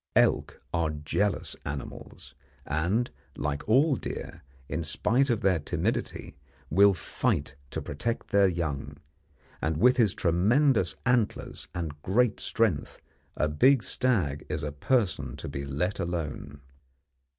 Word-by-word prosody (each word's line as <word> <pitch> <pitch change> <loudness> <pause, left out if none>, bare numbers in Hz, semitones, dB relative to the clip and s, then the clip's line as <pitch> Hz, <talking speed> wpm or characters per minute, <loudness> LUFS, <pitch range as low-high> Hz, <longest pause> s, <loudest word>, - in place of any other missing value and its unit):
Elk - - +3
are 85 -2 +1
jealous 75 +6 -1
animals, 70 -1 -7 0.3
and, 90 - 0 0.2
like 75 +5 -3
all 140 +5 +5
deer, - - -6 0.3
in 80 +6 -2
spite 120 - +1
of 115 -3 +1
their 95 -3 +3
timidity, 70 -1 -2 0.4
will 100 +4 +6
fight 75 - -1 0.2
to - - -4
protect 115 +12 -3
their 100 -1 +5
young; 75 -5 -3 0.6
and 80 0 0
with 125 - +5
his 110 -6 +3
tremendous 100 - +3
antlers 125 -4 0
and 80 -4 -4
great 115 +6 +2
strength 100 -11 0 0.4
a 75 - +2
big 125 - +4
stag 95 - 0
is - - -2
a 75 - -2
person 75 - 0
to - - -7
be 70 - -4
let 75 +8 -2
alone. 75 -4 -4
90 Hz, 130 wpm, -28 LUFS, 75-115 Hz, 0.6 s, will